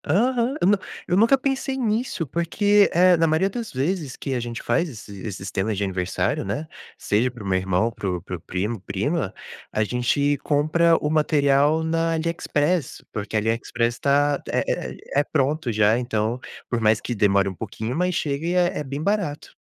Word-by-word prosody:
Aham, 240 - +2
eu - - +2
nu 205 +1 +5 0.3
eu 180 - +3
nunca 230 +6 +5
pensei 270 0 -1
nisso, 225 -6 -1
porque, 200 +7 +3
eh, 180 +1 +5
na 165 0 +3
maioria 160 +5 +2
das 230 +1 -5
vezes, 145 +1 -2
que 135 - -4
a 125 - 0
gente 120 0 -5
faz 170 0 +1
esse 105 -6 -10
esse 100 -2 -5
sistema 95 +2 -2
de 100 - -1
aniversário, 95 -2 -1
né, 110 +11 -3 0.3
seja 110 +5 +1
para 120 -3 -11
o - - -6
meu 95 -1 +2
irmão, 95 +4 +1
para 100 -3 -4
o 90 -1 -2
para 90 - -6
o - - -8
primo 100 +6 -3
prima, 105 - -2 0.4
a 110 - +1
gente 130 +5 +1
compra 155 +3 +3
o - - -2
material 150 0 +3
na 165 +1 0
Aliexpress, 165 -1 -1
porque 105 +1 -4
a - - +4
Aliexpress 115 +2 0
está, 140 +3 +2
é - - +1 0.3
é - - -10 0.2
é - - +3
pronto, 145 -2 0
já, 110 +1 +3
então, 115 -1 -1 0.3
por 120 -2 -1
mais 110 0 +4
que 120 - -4
demore 100 -2 +3
um 95 - -3
pouquinho, 110 +4 -5
mas 180 +1 0
chega 145 0 -2
e 175 - 0
é 180 -1 +2
é - - -2
bem 140 +2 -5
barato. 200 -6 -2
140 Hz, 195 wpm, -23 LUFS, 110-170 Hz, 0.4 s, nu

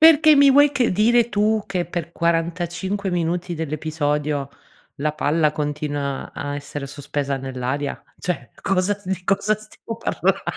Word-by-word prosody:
Perché 315 -1 +8
mi 280 0 +7
vuoi 290 +1 +6
che 250 -8 +1
dire 235 +4 +4
tu 215 0 +1
che 180 -3 -1
per 170 -1 -5
45 170 +3 -1
minuti 175 +1 -1
dell'episodio, 150 -2 -1 0.5
la 150 +1 -1
palla 155 +1 +2
continua 145 -2 -3
a 145 0 -4
essere 145 0 -5
sospesa 140 -1 -3
nell'aria? 135 +2 -3 0.2
Cioè 175 -9 -3
cosa 195 +2 +1
di 185 -1 -3
cosa 200 +2 +2
stiamo 215 +1 -9
parlando? - - 0
170 Hz, 135 wpm, -22 LUFS, 145-205 Hz, 0.5 s, Perché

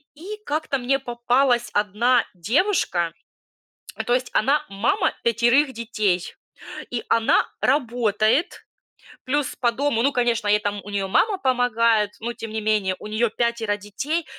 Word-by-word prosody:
и 385 +8 -8
как-то 300 -1 -1
мне 265 +2 0
попалась 240 0 +1
одна 220 +4 +2
девушка, 185 - 0 0.9
то 240 - +2
есть 250 0 0
она 275 +6 +2
мама 195 +3 0
5 240 +5 +3
детей, 215 -6 -1 0.6
и 240 -2 -3
она 230 -1 +3 0.2
работает, 245 - +1 0.6
плюс 290 +2 -1
по 240 -2 +2
дому, 265 -1 0
ну, 275 +4 +3
конечно, 240 -4 0
ей 210 0 +4
там, 205 -1 -3
у 205 - -10
неё 200 -1 -2
мама 405 - +2
помогает, 230 - +2
но 235 +2 -3
тем 225 - -7
не 220 0 -3
менее, 210 -3 +1
у - - -10
нее 220 +2 0
пятеро 230 -2 -1
детей, 275 +11 -3
235 Hz, 140 wpm, -23 LUFS, 210-265 Hz, 0.9 s, ей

